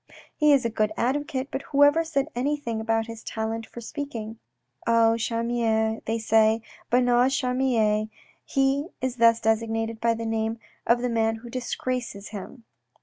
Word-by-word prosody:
He 300 0 +4
is 275 -4 +4
a 230 - 0
good 215 -1 0
advocate, 270 +1 -1
but 270 - -3
whoever 290 +4 +4
said 295 -4 -1
anything 245 -3 -2
about 225 0 0
his 230 -1 -8
talent 220 0 -3
for 235 - -10
speaking? 230 -5 -6 0.2
' - - -52
Oh, 230 -1 +5
Charmier,' 230 -1 0
they 225 +1 0
say, 225 0 +3 0.3
1 245 +1 +3
Bernard's 245 +2 +3
Charmier,' 235 -5 +1 0.3
he 275 +2 +1
is 255 -1 -2
thus 230 0 +5
designated 225 0 -1
by 230 0 +2
the 230 0 -5
name 225 0 -1 0.3
of 240 +1 +3
the - - +2
man 225 -1 +1
who 235 +1 -11
disgraces 250 -4 -4
him." 220 +4 -9
230 Hz, 160 wpm, -25 LUFS, 225-255 Hz, 0.3 s, Oh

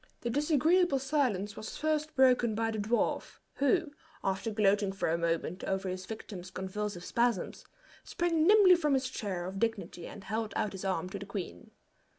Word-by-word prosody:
The 235 - -2
disagreeable 305 +3 +3
silence 255 -8 0
was 215 - -7
first 310 0 -1
broken 250 -4 +4
by 225 +1 0
the 220 - -3
dwarf, 220 +4 -1 0.2
who, 305 +3 +2 0.3
after 195 +3 -1
gloating 205 -2 +2
for 195 -3 -2
a 165 - +2
moment 170 +2 -1
over 190 0 -1
his 185 0 -5
victim's 195 -4 -7
convulsive 190 0 -4
spasms, 235 -5 -1 0.4
sprang 335 -2 +1
nimbly 405 -3 +8
from 300 -5 +2
his 260 -1 0
chair 195 -8 -4
of 190 +1 -5
dignity 195 -6 -2
and 205 - -10
held 220 +2 -3
out 210 - 0
his 190 -1 -7
arm 185 -2 -1
for 195 +2 -6
the 200 - -8
queen. 175 - -6
215 Hz, 170 wpm, -31 LUFS, 190-275 Hz, 0.4 s, nimbly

